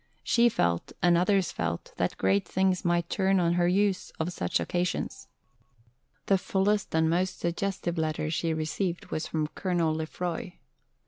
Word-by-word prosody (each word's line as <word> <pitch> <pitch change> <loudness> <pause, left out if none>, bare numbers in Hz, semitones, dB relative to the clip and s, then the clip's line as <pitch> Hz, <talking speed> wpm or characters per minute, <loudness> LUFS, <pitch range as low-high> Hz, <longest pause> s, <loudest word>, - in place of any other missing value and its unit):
She 240 0 +4
felt, 85 - 0
and 175 -1 +5
others 185 +2 +2
felt, 85 +1 -3
that - - -1
great 95 +1 +2
things 190 -1 +1
might 175 -1 +1
turn 195 0 +2
on 170 -1 +2
her 175 0 +2
use 195 +1 +1
of 170 +2 -1
such - - 0
occasions. 175 0 -2 1.0
The 195 -1 +3
fullest 195 0 0
and 160 0 +3
most 180 +3 0
suggestive 175 0 -2
letter 155 -1 -1
which 155 +1 -1
she 165 +1 0
received 165 +3 -2
was 155 - -2
from 155 -1 -1
Colonel 175 -4 0
Lefroy. 170 +3 -4
175 Hz, 155 wpm, -28 LUFS, 160-190 Hz, 1.0 s, and